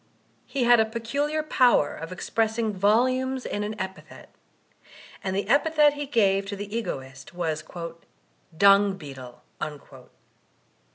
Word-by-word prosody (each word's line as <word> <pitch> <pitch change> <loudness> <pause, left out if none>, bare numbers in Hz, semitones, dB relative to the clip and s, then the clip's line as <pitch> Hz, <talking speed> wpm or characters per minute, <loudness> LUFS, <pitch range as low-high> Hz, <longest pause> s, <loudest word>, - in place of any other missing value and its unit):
He 270 -3 -1
had 240 0 +6
a 220 - +4
peculiar 280 +8 -2
power 250 - +3
of 165 - -8
expressing 220 +3 -1
volumes 255 +6 +1
in 205 - -3
an 215 +1 -5
epithet; 190 0 -8 0.9
and 190 -1 -2
the 200 0 -2
epithet 295 +3 +4
he 290 -1 -5
gave 200 -6 +2
to 200 - -4
the 205 +2 -6
Egoist 135 - -6
was 160 -3 -2 0.9
'"Dung 200 0 +5
Beetle." 130 -6 -11
210 Hz, 120 wpm, -25 LUFS, 190-255 Hz, 0.9 s, had